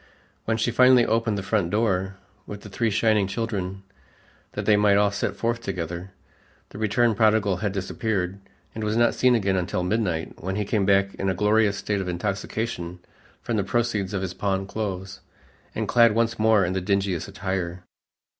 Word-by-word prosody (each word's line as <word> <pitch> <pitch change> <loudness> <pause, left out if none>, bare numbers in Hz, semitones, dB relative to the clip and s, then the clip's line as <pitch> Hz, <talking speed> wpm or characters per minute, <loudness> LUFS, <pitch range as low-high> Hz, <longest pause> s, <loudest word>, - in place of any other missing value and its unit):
When 110 0 0
she 115 +2 0
finally 125 0 +6
opened 115 -2 0
the 100 - -4
front 100 -4 0
door 95 -2 0 0.3
with 105 -1 -7
the 105 - -10
three 115 +3 0
shining 110 -1 +2
children 95 -3 -3 0.7
that - - -4
they 105 - +5
might 105 -1 +4
all 100 0 +3
set 100 0 -2
forth 115 +2 -1
together, 90 -3 -5 0.6
the - - -10
returned 110 +1 +2
prodigal 110 -4 +3
had 100 +1 -2
disappeared, 95 -1 -2 0.3
and 110 - -5
was 105 +1 0
not 120 0 +4
seen 125 -1 +3
again 100 -4 +1
until 90 0 -1
midnight, 90 -5 -2
when 95 +1 -2
he 105 0 -1
came 100 -2 0
back 100 0 +3
in 95 - -2
a 95 - 0
glorious 105 +1 +2
state 100 -1 -2
of 95 - -5
intoxication 95 0 -3 0.5
from 115 - -1
the 100 - +1
proceeds 105 -2 -1
of 95 - -2
his 90 -2 -4
pawned 95 0 -2
clothes 95 -3 -4 0.6
and - - -2
clad 115 -2 +5
once 115 0 0
more 110 -3 +4
in 90 - -2
the 95 - -1
dingiest 95 -2 -1
attire. 95 -3 -4
100 Hz, 185 wpm, -24 LUFS, 95-110 Hz, 0.7 s, finally